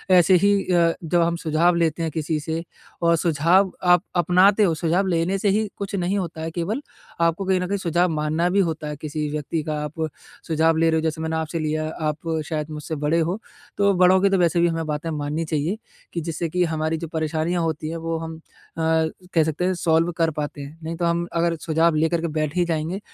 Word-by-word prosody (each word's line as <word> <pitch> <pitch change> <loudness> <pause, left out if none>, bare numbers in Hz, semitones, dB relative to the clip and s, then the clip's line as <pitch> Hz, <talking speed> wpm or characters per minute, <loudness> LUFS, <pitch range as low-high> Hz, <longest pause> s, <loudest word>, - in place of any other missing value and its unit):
ऐसे 180 +1 +6
ही 200 +2 +4 0.2
अ, 170 -1 +4
जब 170 +1 +2
हम 170 0 +1
सुझाव 170 +1 +2
लेते 165 -1 +1
हैं 160 - -1
किसी 155 0 -2
से 160 +2 -3 0.4
और 170 0 +4
सुझाव 170 +4 +3
आप 180 0 +5
अपनाते 185 +4 +4
हो, 170 -5 +3
सुझाव 175 +4 +1
लेने 175 +2 +1
से 200 - +2
ही 215 +2 +1
कुछ 200 0 -4
नहीं 185 +2 0
होता 170 -4 -4
है 160 +1 -3
केवल, 180 - -2 0.4
आपको 170 +3 +1
कहीं 190 -1 +2
न 180 - -2
कहीं 200 +2 -1
सुझाव 175 -1 +1
मानना 155 +3 0
भी 200 +2 +2
होता 160 -4 -1
है, 150 - -4
किसी 150 0 -3
व्यक्ति 150 +1 -2
का 155 - -1
आप 160 +2 -4 0.4
सुझाव 160 0 +2
ले 165 0 +3
रहे 160 - +2
हो - - +1
जैसे 160 0 -2
मैंने 160 0 -2
आपसे 160 +1 -2
लिया, 155 0 -1
आप 155 +1 -3 0.2
शायद 155 -1 -2
मुझसे 150 +1 -5
बड़े 150 +3 +1
हो, 175 +6 -1 0.4
तो 200 -1 +4
बड़ों 185 0 +5
की 200 - +4
तो 195 - +2
वैसे 175 -1 +2
भी 175 - +4
हमें 165 -1 -2
बातें 150 +2 -3
माननी 150 +2 -2
चाहिए, 155 +6 -1 0.4
कि 170 - -2
जिससे 165 +1 -3
कि 180 +2 +1
हमारी 160 0 -1
जो 165 0 -5
परेशानियाँ 160 +2 -1
होती 155 -1 -2
हैं, 165 - -4
वो 165 0 -3
हम 160 0 -6
अ, - - -17 0.9
कह 165 - +4
सकते 160 +3 -1
हैं 185 - +2
सॉल्व 165 0 +2
कर 165 -1 +3
पाते 145 -1 -5
हैं। 140 +3 -9
नहीं 165 +1 -4
तो 175 - -1
हम 170 0 0
अगर 170 0 +2
सुझाव 165 0 +2
लेकर 160 +2 +1
के 170 - -1
बैठ 155 +1 -1
ही 175 -1 +2
जाएँगे, 165 +3 -2
165 Hz, 230 wpm, -23 LUFS, 155-175 Hz, 0.9 s, ऐसे